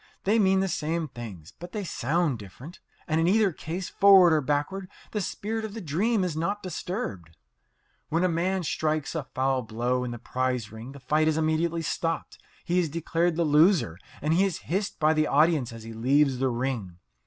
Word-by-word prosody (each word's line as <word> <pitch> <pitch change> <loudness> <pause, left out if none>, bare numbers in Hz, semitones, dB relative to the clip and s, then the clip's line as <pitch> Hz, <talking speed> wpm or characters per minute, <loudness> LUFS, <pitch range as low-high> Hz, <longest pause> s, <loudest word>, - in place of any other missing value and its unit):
They 215 +4 +3
mean 190 -2 +4
the 195 - +1
same 160 -1 -2
things, 105 - -9
but 175 +1 -9
they 210 - -3
sound 155 - 0
different. 125 - -11 0.3
And 160 0 +1
in 165 - +2
either 205 +1 +4
case, 175 +4 -5
forward 195 -4 +6
or 155 - +3
backward, 150 +8 -2 0.2
the 210 - -1
spirit 220 +4 -3
of 215 -1 -6
the - - -4
dream 195 +6 0
is 175 -4 -2
not 195 +6 -2
disturbed. 155 - -5 0.7
When 165 +3 +1
a - - +4
man 180 +2 0
strikes 155 -1 -1
a 160 - -1
foul 130 0 +1
blow 120 +3 -1
in 125 - -3
the 120 - -5
prize 125 -2 -2
ring 115 +4 -9
the 140 - -11
fight 155 +3 +1
is 160 -1 +2
immediately 160 +1 0
stopped, 165 0 -3 0.3
he 175 +1 +2
is 170 -3 0
declared 165 +2 0
the 170 - +1
loser, 150 - +3 0.2
and 155 +2 +2
he 180 +4 +4
is 195 -4 -1
hissed 195 +4 -2
by 155 0 +4
the 155 -1 +2
audience 150 -4 +3
as 115 -1 -9
he 115 0 -8
leaves 135 +3 +2
the 135 0 +2
ring. 120 -8 -3
160 Hz, 200 wpm, -27 LUFS, 130-180 Hz, 0.7 s, forward